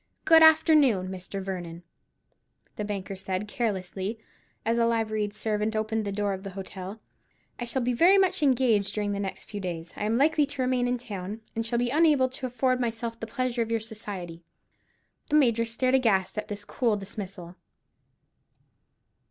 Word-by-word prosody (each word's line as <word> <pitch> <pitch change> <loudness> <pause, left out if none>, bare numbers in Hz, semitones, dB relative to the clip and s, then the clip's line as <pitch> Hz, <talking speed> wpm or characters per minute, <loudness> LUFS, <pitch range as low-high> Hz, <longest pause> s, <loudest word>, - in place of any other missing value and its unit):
"Good 325 0 +7
afternoon, 305 - +5
Major 190 +1 -6
Vernon," 175 -3 -6 0.9
the 210 - -3
banker 200 -2 -4
said, 190 +1 -3
carelessly, 200 -1 -2 0.5
as 230 +1 +1
a 230 - +4
liveried 215 -2 0
servant 215 +1 -1
opened 220 0 -1
the 200 - -2
door 200 0 -1
of 190 - -5
the 195 - -6
hotel: 190 +2 -7 0.6
"I 240 - -3
shall 245 +2 0
be 250 +1 +1
very 350 +10 +6
much 380 -2 +2
engaged 240 -8 +2
during 205 -1 -1
the 200 -1 -1 0.2
few 205 - -6
days 170 -3 -5
I 210 - -3
am 220 +2 +1
likely 300 +1 +3
to 275 -2 -5
remain 250 -1 +1
in 250 0 0
town, 205 -2 -6
and 225 - -1
shall 230 +1 -1
be 240 0 0
unable 295 -4 +4
to 260 0 -4
afford 255 +1 +1
myself 230 -1 -3
the 225 - -5
pleasure 245 +1 -1
of 230 - -1
your 230 0 +1
society." 205 -6 -7 0.9
The - - +2
Major 235 -6 +4
stared 255 +3 0
aghast 220 -8 +2
at 215 - -4
this 205 0 -7
cool 230 -3 0
dismissal. 195 -3 -8
220 Hz, 170 wpm, -27 LUFS, 195-250 Hz, 0.9 s, Good